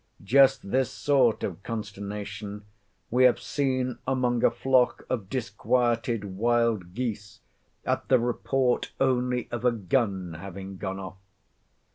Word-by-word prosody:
Just 130 -2 +4
this 130 -3 +2
sort 130 -6 +2
of 90 -1 -4
consternation 105 -1 -6 0.5
we 125 +2 +5
have 125 - +5
seen 130 -3 -1
among 125 -2 +1
a - - +7
flock 130 -2 +2
of 110 -7 -2
disquieted 120 0 0
wild 110 -2 0
geese 110 -4 -4 0.5
at - - -1
the 130 - +5
report 125 +1 0
only 125 -1 +1
of 120 0 -4
a 125 - +4
gun 95 -5 -1
having 95 +1 -8
gone 95 +1 -4
off! 95 -1 -8
115 Hz, 125 wpm, -27 LUFS, 100-125 Hz, 0.5 s, a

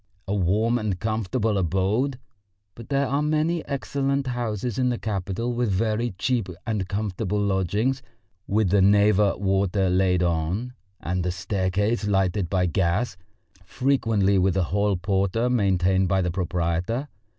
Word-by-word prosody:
A 100 - -1
warm 105 +5 +1
and 105 -5 -2
comfortable 110 0 -1
abode? 95 - 0 0.6
But 115 +4 -12
there 140 0 +1
are 140 +2 0
many 155 +2 0
excellent 140 0 -1
houses 120 -2 -3
in 125 -1 +2
the 120 - -1
capital 105 +3 -3
with 120 -1 0
very 110 +2 0
cheap 115 -2 0 0.2
and 105 -5 -2
comfortable 105 0 -2
lodgings, 105 +6 0 0.5
with 105 -2 +1
the 100 -1 +4
Neva 100 0 +4
water 95 -1 +1
laid 90 -1 +2
on, 90 +9 -1 0.3
and 90 +1 -2
a 90 - -1
staircase 100 +4 -1
lighted 95 -2 +1
by 90 0 +1
gas, 90 +5 0 0.5
frequently 110 -4 +1
with 95 +1 +2
a 95 - +2
hall 100 -1 +2
porter 100 +6 0
maintained 95 -4 +2
by 95 +1 +1
the 90 - -1
proprietor. 90 - -1
100 Hz, 140 wpm, -24 LUFS, 95-120 Hz, 0.6 s, the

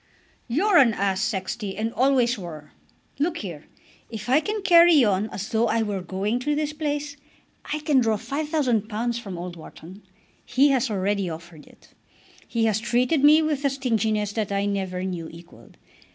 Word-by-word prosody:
"You're 350 - +2
an 235 -8 +5
ass, 195 -1 0
Sexty, 200 -2 -3
and 225 +2 -2
always 255 -2 +2
were. 160 -7 -9 0.5
Look 330 +3 0
here. 170 - -7 0.4
If 220 0 -7
I 270 +4 +5
can 420 +4 -4
carry 340 -5 +6
on 205 +1 0
as 205 +1 -6
though 225 +1 +1
I 225 0 +1
were 205 -3 -3
going 195 +6 -2
to 295 +4 -1
this 300 0 -2
place, 295 -1 -3 0.5
I 305 - -2
can 295 -3 +3
draw 225 -3 +1
£5000 240 -5 -1
from 195 -6 -7
old 175 0 -6
Wharton. 175 +4 -12 0.4
He 270 +4 +3
has 265 -2 +1
already 200 -2 -1
offered 165 -1 -10
it. - - -21 0.5
He 230 -1 0
has 220 -1 +1
treated 250 +6 +1
me 305 +2 +7
with 300 -2 -1
a 280 - +3
stinginess 220 -6 -1
that 215 -2 -2
I 200 0 0
never 190 -2 -2
knew 175 -4 -4
equalled. 170 +1 -15
225 Hz, 170 wpm, -24 LUFS, 195-280 Hz, 0.5 s, me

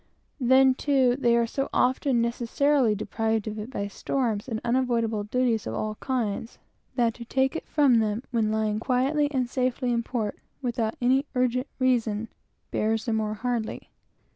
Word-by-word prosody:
Then, 260 +1 +5
too, 260 -2 +2
they 240 -3 +3
are 235 - +3 0.3
often 255 -1 +2
necessarily 240 +1 +2
deprived 220 +1 -1
of 215 0 -4
it 210 +3 -6
by 200 -6 -3
storms, 225 +1 -2
and 225 -3 -3
unavoidable 235 -4 +1
duties 235 -1 0
of - - -3
all 215 0 -2
kinds, 230 -4 -2 0.4
that 235 -3 +2
to 235 - -9
take 265 +4 +1
it - - -5
from 275 -6 +4
them 215 +2 -1
when 225 -3 +1
lying 215 -1 0
quietly 270 +5 +1
and 255 -3 0
safely 250 0 -1
in 235 - +1
port, 225 -3 -3 0.2
without 235 -4 -2
any 265 +4 +3
urgent 250 +1 +1
reason, 230 -4 +1 0.4
bears 220 +2 0
the 230 - 0
more 215 -1 -1
hardly. 235 0 -3
240 Hz, 160 wpm, -26 LUFS, 220-255 Hz, 0.4 s, Then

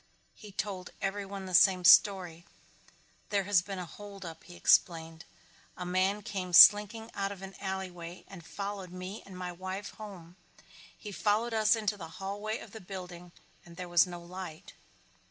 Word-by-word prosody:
He 210 -2 -13
told 190 -2 -4
everyone 195 0 -4
the 185 - -7
same 180 0 +5
story. 180 -4 +5 0.9
"There 200 -2 +1
has 195 -2 +3
been 195 +1 -7
a 180 - -5
holdup," 195 -2 -10
he 175 - -12
explained. 165 -2 +2 0.5
"A 180 - -5
man 190 +3 0
came 185 -3 -5
slinking 210 +5 +7
out 195 0 -2
of 195 -1 -9
an 195 0 -8
alleyway 185 -3 -6
and 190 -4 -11
followed 200 +1 -6
me 185 +3 -7
and 190 -2 -10
my 180 -1 -5
wife 185 +3 -6
home. 185 -5 -11 0.6
He 210 - -9
followed 215 +4 0
us 215 0 +4
into 210 -2 -2
the 165 -4 -8
hallway 205 +3 -4
of 210 - -12
the 220 - -10
building 180 -2 -9 0.3
and 170 -1 -15
there 180 - -6
was 175 +1 +4
no 175 -1 -7
light." 175 -2 -9
190 Hz, 165 wpm, -30 LUFS, 180-205 Hz, 0.9 s, slinking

